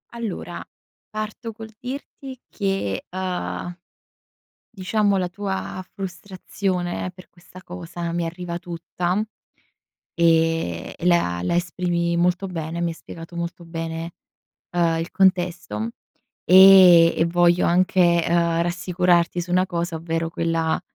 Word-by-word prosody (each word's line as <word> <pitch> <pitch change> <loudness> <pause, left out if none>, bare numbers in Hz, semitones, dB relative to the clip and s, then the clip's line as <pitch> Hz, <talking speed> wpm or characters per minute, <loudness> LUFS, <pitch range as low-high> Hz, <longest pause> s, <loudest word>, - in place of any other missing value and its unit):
Allora, 225 -5 -5 0.5
parto 215 +2 -5
col 220 0 -10
dirti 260 0 -8
che 195 - -2
uhm, 180 -1 -4 0.9
diciamo 205 -1 0
la 180 -1 -1
tua 190 -1 -4
frustrazione 185 -1 -4
per 185 0 -15
questa 180 +1 -15
cosa 175 -1 -6
mi 170 0 -1
arriva 170 0 -5
tutta. 175 +3 -3 0.9
Ehm, 165 - +1
la 130 - +2
la 90 - 0
esprimi 175 -1 0
molto 180 +2 +1
bene, 170 -1 -4
mi 170 - +1
hai - - -3
spiegato 165 +1 -11
molto 170 0 -5
bene, 165 0 -5 0.6
ehm, 170 -2 +1
il 165 - -4
contesto, 175 - +1 0.5
e 185 -2 +8
e 165 - +3
voglio 175 +1 +3
anche, 175 -1 +3
uhm, 170 -1 +2
rassicurarti 175 0 +1
su 175 - -9
una 185 +1 +3
cosa, 170 -1 -3
ovvero 165 0 -2
quella, 165 -1 0
175 Hz, 115 wpm, -23 LUFS, 170-185 Hz, 0.9 s, e